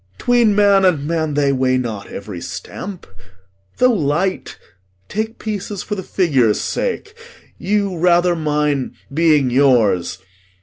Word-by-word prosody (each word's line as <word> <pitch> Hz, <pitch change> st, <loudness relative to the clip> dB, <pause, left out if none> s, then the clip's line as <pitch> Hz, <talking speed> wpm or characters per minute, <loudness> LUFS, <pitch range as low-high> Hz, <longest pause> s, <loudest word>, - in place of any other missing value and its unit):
'Tween 235 Hz, -, +3 dB
man 200 Hz, -1 st, +4 dB
and 165 Hz, -7 st, +2 dB
man 160 Hz, -3 st, -1 dB
they 140 Hz, -1 st, +2 dB
weigh 130 Hz, -1 st, +1 dB
not 115 Hz, -5 st, -4 dB
every 100 Hz, -4 st, -8 dB
stamp; 190 Hz, -, -7 dB, 0.7 s
Though 255 Hz, -1 st, +4 dB
light, 175 Hz, +1 st, -1 dB, 0.5 s
take 220 Hz, +2 st, -4 dB
pieces 205 Hz, -2 st, -5 dB
for 210 Hz, -, -5 dB
the 195 Hz, -, -3 dB
figure's 135 Hz, -, +1 dB
sake; 455 Hz, -3 st, -3 dB, 0.5 s
You 200 Hz, -3 st, -1 dB
rather 175 Hz, 0 st, +3 dB
mine, 150 Hz, -3 st, -1 dB, 0.2 s
being 150 Hz, -4 st, +3 dB
yours. 115 Hz, -10 st, +2 dB
165 Hz, 125 wpm, -18 LUFS, 135-200 Hz, 0.7 s, man